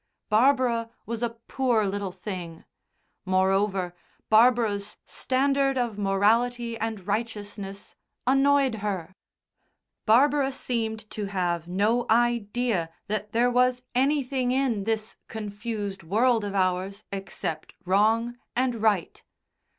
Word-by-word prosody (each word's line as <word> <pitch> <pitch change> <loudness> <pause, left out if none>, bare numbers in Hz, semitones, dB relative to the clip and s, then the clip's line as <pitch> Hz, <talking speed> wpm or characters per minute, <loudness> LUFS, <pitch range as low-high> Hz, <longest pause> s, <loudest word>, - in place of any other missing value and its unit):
Barbara 235 0 +3 0.2
was 230 0 -4
a 240 - +1 0.2
poor 245 -5 +1
little 200 -1 -2
thing. 180 -3 -7 0.6
Moreover, 190 -1 +1 0.4
Barbara's 220 -3 +3
standard 275 +1 +1
of 235 -4 -1
morality 230 +4 +2
and 220 -4 -4
righteousness 205 -2 -4 0.3
annoyed 270 0 +4
her. 190 -4 -3 0.9
Barbara 275 +4 +4
seemed 225 -4 -3
to 210 - -3
have 175 -4 -1
no 210 +7 +1
idea 235 -5 +1 0.2
that 210 0 -2
there 240 +3 +3
was 250 0 +2
anything 265 -1 +1
in 250 -6 0
this 220 -1 -2
confused 210 -2 -5
world 225 +6 +2
of 200 -1 -4
ours 190 +2 0
except 195 -5 -5
wrong 225 +5 +2 0.2
and 245 -3 0
right. 210 -6 +1
220 Hz, 105 wpm, -26 LUFS, 200-245 Hz, 0.9 s, annoyed